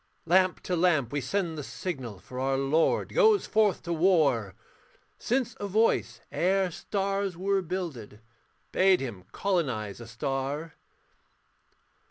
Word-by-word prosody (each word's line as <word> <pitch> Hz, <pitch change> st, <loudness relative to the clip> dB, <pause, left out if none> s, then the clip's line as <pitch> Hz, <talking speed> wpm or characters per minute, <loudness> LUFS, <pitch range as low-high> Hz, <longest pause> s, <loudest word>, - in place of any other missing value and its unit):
Lamp 185 Hz, +2 st, +3 dB
to 180 Hz, -, -1 dB
lamp 165 Hz, -8 st, +2 dB
we 145 Hz, -, 0 dB
send 165 Hz, +3 st, -2 dB
the -, -, -4 dB
signal, 120 Hz, -, -5 dB
For 125 Hz, +7 st, -9 dB
our 135 Hz, +1 st, +1 dB
lord 140 Hz, +4 st, +1 dB
goes 440 Hz, -4 st, +4 dB
forth 215 Hz, -3 st, +2 dB
to 170 Hz, -, -2 dB
war; 155 Hz, -, +2 dB, 0.6 s
Since 250 Hz, 0 st, -1 dB
a 205 Hz, -, -3 dB
voice, 220 Hz, +4 st, +1 dB
ere 190 Hz, +1 st, +1 dB
stars 195 Hz, 0 st, -2 dB
were 195 Hz, +1 st, +1 dB
builded, 165 Hz, -, -5 dB, 0.5 s
Bade 190 Hz, -1 st, +4 dB
him 110 Hz, -9 st, -6 dB
colonise 130 Hz, -, -1 dB
a 115 Hz, -, -9 dB
star. 135 Hz, +6 st, -3 dB
165 Hz, 130 wpm, -28 LUFS, 130-190 Hz, 0.6 s, goes